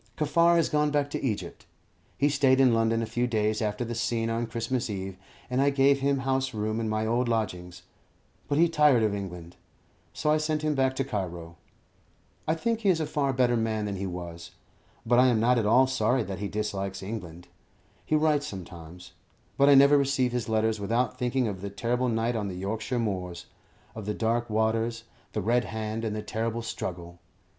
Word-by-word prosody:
Kaffar 170 +3 +3
has 165 -2 +3
gone 150 0 +1
back 145 -1 0
to - - -4
Egypt. 110 -6 -4 0.5
He 145 - +3
stayed 135 -2 +3
in 130 -3 +5
London 115 0 +2
a - - -1
few 120 +3 -1
days 110 -2 0
after 105 +2 -2
the 120 - -4
scene 115 -1 -1
on 115 +1 -1
Christmas 115 +2 -2
Eve, 95 -2 -5 0.3
and 125 +1 0
I 140 - +4
gave 140 0 +3
him 135 0 +1
house 130 -2 0
room 110 +1 -1
in 110 -1 -2
my 110 0 -1
old 120 +2 +1
lodgings; 90 -6 -3 0.6
but 145 - 0
he 170 +2 +5
tired 150 -7 +4
of 105 -2 +1
England, 90 -4 -7 0.5
so 150 - 0
I 155 - +4
sent 155 0 -1
him 155 -1 +1
back 130 -1 +1
to 135 - 0
Cairo. 90 -9 -5 0.9
I 160 - +2
think 230 +6 -1
he 210 -3 +1
is 175 -3 +3
a 155 - 0
far 145 -2 0
better 125 -2 +2
man 110 -2 -1
than 100 -1 -3
he 95 +1 -3
was, 85 -1 -7 0.6
but 120 +2 +4
I 130 - +6
am 120 -3 +3
not 120 +2 +3
at 105 - 0
all 125 +5 +5
sorry 125 -1 +1
that 100 -2 -6
he 100 - -2
dislikes 100 -2 -3
England. 90 -5 -7 0.6
He 155 - 0
writes 150 -1 +2
sometimes, 90 -1 -10 0.4
but 140 +1 +4
I 140 - +8
never 140 +1 +7
receive 135 -2 +1
his 120 -3 -3
letters 110 0 +1
without 115 +5 -1
thinking 125 0 0
of 95 -3 -5
the 100 - -4
terrible 120 +5 -1
night 115 +1 0
on 105 -2 -2
the 95 - -5
Yorkshire 105 +6 -3
moors 95 -6 -3 0.5
of 110 -2 -8
the 105 - -1
dark 115 +1 0
waters, 110 +1 0 0.3
the 105 - -1
red 120 +3 +2
hand, 110 0 -4
and 110 -2 -2
the 105 - -4
terrible 115 +2 -3
struggle. 85 -5 -6
115 Hz, 200 wpm, -27 LUFS, 105-130 Hz, 0.9 s, I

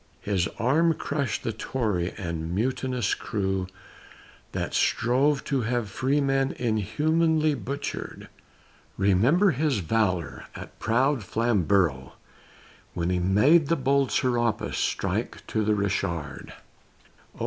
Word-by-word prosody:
His 95 -4 0
arm 155 +9 +3
crushed 140 -7 -2
the 115 - -2
Tory 105 -6 -2
and 85 -3 -4
mutinous 125 0 0
crew 95 -3 -2 0.8
That - - -3
strove 140 +4 +2
to 135 -3 -1
have 120 -2 -2
freemen 135 +2 +1
inhumanly 155 - +1
butchered; 140 +3 -5 0.7
Remember 120 - +4
his 145 -2 0
valor 90 -5 -1
at - - -10
proud 125 +2 +1
Flamborough, 95 - +1 0.8
When 85 +1 -1
he 90 - +1
made 120 - +4
the 165 - +2
bold 135 -2 +1
Serapis 120 -3 0
strike - - -2
to 110 - -1
the 105 0 +2
Richard; 95 -7 -2 0.8
Oh! - - -17
115 Hz, 110 wpm, -26 LUFS, 95-140 Hz, 0.8 s, Remember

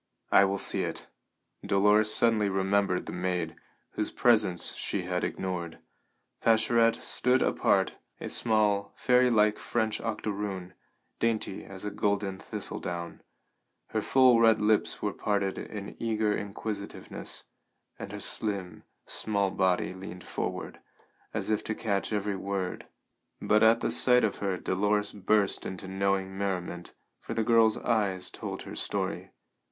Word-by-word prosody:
"I 100 - +7
will 100 +1 -1
see - - +1
it." - - -3 0.6
Dolores 105 +2 +4
suddenly 110 -3 +3
remembered 95 -1 +1
the - - -6
maid, 90 -2 -2 0.4
whose - - -1
presence 90 -2 +3
she 95 - -3
had 90 0 -2
ignored. 90 -3 -3 0.6
Pascherette 115 +1 +3
stood 125 +1 +2
apart, - - +1 0.2
a - - -5
small, 105 -3 +1
fairylike 120 -4 +3
French 110 -2 -1
octoroon, 100 -4 -4 0.5
dainty 115 -4 -1
as 100 +1 -7
a 105 - -3
golden 100 -2 -1
thistledown; 85 -1 -4 0.7
her - - -1
full 130 -3 +5
red 115 -1 +5
lips 105 0 +1
were - - 0
parted 100 -2 -1
in 100 -2 -7
eager 110 -2 +1
inquisitiveness, 100 0 -5 0.6
and - - -7
her - - -6
slim, 95 -6 -1 0.2
small 100 -3 -1
body 95 -1 +1
leaned 95 -1 -9
forward, - - -5 0.5
as - - -2
if 105 - 0
to 110 - -2
catch 100 -2 -1
every 105 -1 -1
word; 95 -1 -4 0.5
but 105 0 +2
at 115 +1 +5
sight 125 -1 +5
of 105 - 0
her 95 -2 -2
Dolores 105 +3 0
burst 100 0 +1
into 95 +1 -6
knowing 95 0 -1
merriment, 90 -3 -4 0.2
for 115 - -6
the 115 - +1
girl's 115 -1 +4
eyes 100 -5 0
told - - -6
her - - -8
story. - - -3
100 Hz, 135 wpm, -29 LUFS, 95-110 Hz, 0.7 s, I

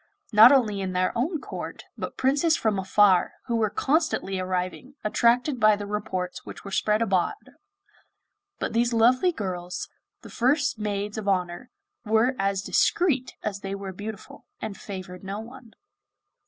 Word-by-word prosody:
Not 220 +4 +9
only 220 -8 +2
in 185 -1 -3
their 185 0 0
own 300 +8 -1
court, - - -7
but - - -6
princes 290 +5 +2
from 215 -3 0
afar, 190 -1 +3
who 235 - -1
were 220 -2 +1
constantly 270 - 0
arriving, 185 +8 -3
attracted 245 +5 +2
by 215 -1 +5
the 205 0 -6
reports 200 -3 -4
which - - -10
were 200 - -7
spread 210 +3 +1
abroad; 190 -5 +1 1.2
but - - -3
these 235 +1 +2
lovely 250 +9 +4
girls, 180 - -5 0.3
the - - -10
first 265 0 +1
Maids 205 0 -3
of 205 - -7
Honour, 185 +4 -1 0.3
were 225 +3 +2
as 195 0 0
discreet 275 - +1
as 200 -2 -3
they 195 0 -4
were 195 -1 -6
beautiful, 205 +2 -9
and 215 -2 -5
favoured 185 -2 -8
no 195 +2 -5
one. 235 +1 -12
210 Hz, 155 wpm, -26 LUFS, 195-245 Hz, 1.2 s, Not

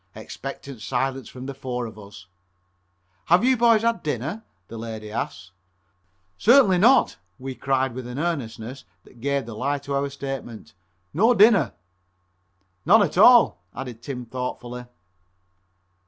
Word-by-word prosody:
Expectant 135 -2 -8
silence 130 +1 -2
from 130 0 -9
the 140 - -5
four 125 -2 -4
of 110 -1 -10
us. 100 -2 -13 1.0
"Have 175 +5 +4
you 260 0 +4
boys 230 -2 +4
had 230 0 +1
dinner?" 150 - -4 0.2
the 115 - -9
lady 110 -2 -7
asked. 90 -4 -5 0.9
"Certainly 230 -6 +5
not," 250 +6 +4 0.2
we 130 +1 -6
cried, 135 -1 -1
with 125 0 -7
an 125 +1 -7
earnestness 130 -6 -4 0.2
that 120 - -19
gave 140 -1 -1
the 115 - -8
lie 140 +6 -1
to 140 0 -6
our 140 +1 0
statement, 135 -5 -7 0.4
"no 225 +9 +4
dinner!" 200 - +5 1.1
"None 205 +6 +6
at 165 - -2
all," 235 - +6
added 125 -3 -7
Tim 125 -1 -6
thoughtfully. 125 0 -6
135 Hz, 140 wpm, -24 LUFS, 120-175 Hz, 1.1 s, None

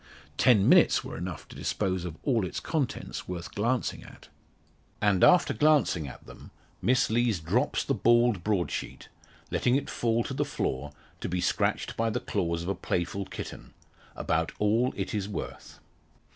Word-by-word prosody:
Ten 105 - +4
minutes - - +5
were - - -7
enough 85 -2 -6
to - - -13
dispose 95 -3 -1
of 80 -3 -6
all 120 -7 +2
its 90 - -3
contents 145 -7 -3
worth 90 -2 -6
glancing 120 +4 -1
at. - - -15 0.7
And 100 -3 +2
after 180 - +6
glancing 145 - +3
at 65 - -11
them, - - -13 0.3
Miss 125 -2 +2
Lees 115 -4 +2
drops 80 - 0
the - - 0
bald 120 -5 +3
broadsheet 100 -4 -2 0.4
letting 125 0 +2
it 140 0 -1
fall 115 0 +1
to 135 - -5
the 145 +2 0
floor 75 - -3 0.3
to - - -4
be 90 +1 -1
scratched - - 0
by 115 0 +1
the 110 - -1
claws 85 -1 -2
of 90 - -4
a - - +1
playful 90 +2 -2
kitten - - -8 0.4
about 80 +1 0
all 115 +5 +2
it 95 - -3
is 105 -1 -2
worth. 100 - -7
105 Hz, 165 wpm, -28 LUFS, 90-120 Hz, 0.7 s, after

